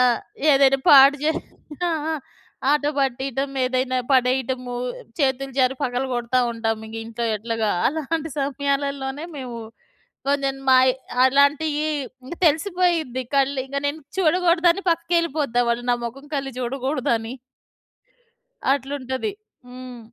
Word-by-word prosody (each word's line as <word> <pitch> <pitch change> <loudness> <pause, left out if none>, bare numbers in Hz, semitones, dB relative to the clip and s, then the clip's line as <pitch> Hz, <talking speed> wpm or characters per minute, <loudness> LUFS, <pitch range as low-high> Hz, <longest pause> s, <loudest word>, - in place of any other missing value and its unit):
ఆ! - - +6 0.5
ఏదైనా 270 -1 +5
పాడు 280 0 +8
జే 310 - +3 0.6
ఆ! - - 0 0.2
ఆ! - - 0 0.6
ఆట 295 0 +2
పట్టీటం, 270 +1 -1
ఏదైనా 255 0 0
పడేయటము, 255 -1 +1 0.4
చేతులు 270 -1 0
జారి 260 0 +3
పగలగొడతావుంటాం 240 -3 -1
ఇంగింట్లో 225 +1 -5
ఎట్లాగా. 225 0 -1 0.2
అలాంటి 315 +1 -3
సమయాలల్లోనే 280 +1 -2
మేవు 245 -4 -6 0.7
కొంచెం 275 -1 +1
మాయి 255 0 +6 0.3
అలాంటియీ 290 +3 +3 0.4
ఇంగ 295 - -7
తెలిసిపోయిద్ది 325 -5 +1
కళ్ళు. 275 0 +2
ఇంగ 280 +1 -6
నేను 290 +2 -3 0.2
చూడకూడదని 350 +1 +3
పక్కకెళ్ళిపోతా 330 -6 0
వాళ్ళు 240 +1 -1
నా - - +4
మొఖం‌ 275 +5 -7
కల్లి 275 -1 -2
జూడకూడదని. 250 -2 -1 1.4
అట్లుంటది. 275 - -3 0.4
హ్మ్. 250 -1 -9
270 Hz, 105 wpm, -23 LUFS, 250-290 Hz, 1.4 s, పాడు